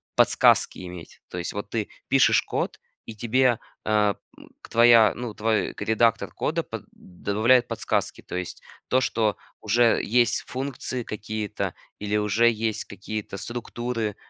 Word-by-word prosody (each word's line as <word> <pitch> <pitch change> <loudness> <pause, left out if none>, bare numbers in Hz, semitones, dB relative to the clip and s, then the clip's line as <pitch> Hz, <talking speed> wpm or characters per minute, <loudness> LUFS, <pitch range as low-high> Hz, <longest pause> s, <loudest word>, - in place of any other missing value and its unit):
подсказки - - +4
иметь. 90 -2 -10
То 90 - -7
есть 90 - -4
вот 105 0 -5
ты 110 -3 -1 0.2
пишешь 135 -2 +5
код- - - -3 0.3
и 110 - -7
тебе, 120 +2 +2 0.3
а, 105 -1 +2 0.2
м, - - -15
к - - -14
твоя, 115 -2 +6
ну, 120 -3 -5
твой 110 -1 0
редактор 110 +1 +1
кода - - -1
под - - -8
добавляет 110 +7 +1
подсказки. - - -2
То - - -8
есть 90 -1 -5 0.3
то, 130 +1 +3
что 110 -3 +1 0.3
уже 115 +2 +3
есть 120 +1 +2
функции 130 -1 -4
какие-то 105 -1 -4 0.3
или 105 +1 -1
уже 105 +3 +3
есть 110 -1 -2
какие-то 100 0 -6
структуры, 120 -2 -4
110 Hz, 145 wpm, -25 LUFS, 105-120 Hz, 0.3 s, твоя